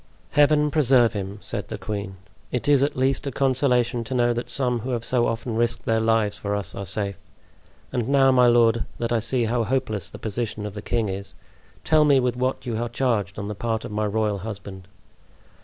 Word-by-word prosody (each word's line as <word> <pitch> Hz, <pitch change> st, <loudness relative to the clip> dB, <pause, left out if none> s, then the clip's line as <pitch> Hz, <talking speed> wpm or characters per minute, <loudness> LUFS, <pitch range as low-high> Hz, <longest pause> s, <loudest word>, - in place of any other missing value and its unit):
"Heaven 150 Hz, 0 st, +4 dB
preserve 130 Hz, -6 st, +4 dB
him!" 100 Hz, -1 st, -5 dB
said -, -, -3 dB
the -, -, -5 dB
queen. 100 Hz, -2 st, -5 dB, 0.4 s
"It 125 Hz, 0 st, -2 dB
is 145 Hz, -2 st, +5 dB
at 140 Hz, +1 st, +1 dB
least 135 Hz, +2 st, 0 dB
a -, -, -2 dB
consolation 125 Hz, -3 st, +1 dB
to 130 Hz, -, -4 dB
know 120 Hz, -1 st, +3 dB
that 120 Hz, +1 st, -4 dB
some 125 Hz, -3 st, 0 dB
who 120 Hz, +4 st, -6 dB
have 120 Hz, -2 st, -2 dB
so 120 Hz, -2 st, +2 dB
often 115 Hz, 0 st, -3 dB
risked 115 Hz, 0 st, 0 dB
their 115 Hz, 0 st, +2 dB
lives 110 Hz, -2 st, +1 dB
for 100 Hz, 0 st, -2 dB
us 100 Hz, -3 st, -3 dB
are 100 Hz, -1 st, -6 dB
safe. 100 Hz, -1 st, -1 dB, 0.7 s
And 120 Hz, 0 st, -1 dB
now, 135 Hz, -1 st, +5 dB
my 125 Hz, -1 st, +5 dB
lord, 115 Hz, -1 st, +4 dB
that 115 Hz, 0 st, -2 dB
I 115 Hz, -, +2 dB
see 120 Hz, +2 st, 0 dB
how 115 Hz, +1 st, 0 dB
hopeless 115 Hz, -6 st, -2 dB
the -, -, -10 dB
position 110 Hz, -1 st, -4 dB
of 105 Hz, -, -5 dB
the 105 Hz, -, -6 dB
king 115 Hz, 0 st, -1 dB
is, 100 Hz, +1 st, -6 dB, 0.5 s
tell 155 Hz, -1 st, +4 dB
me 145 Hz, -3 st, +5 dB
with 125 Hz, -1 st, 0 dB
what 130 Hz, +1 st, -2 dB
you 115 Hz, -3 st, -2 dB
are 120 Hz, -, -2 dB
charged 115 Hz, -7 st, -1 dB
on 100 Hz, 0 st, -4 dB
the 105 Hz, -, -3 dB
part 110 Hz, +1 st, -3 dB
of -, -, -7 dB
my 105 Hz, 0 st, -1 dB
royal 105 Hz, -1 st, 0 dB
husband." 95 Hz, -2 st, -8 dB
115 Hz, 215 wpm, -24 LUFS, 105-130 Hz, 0.7 s, is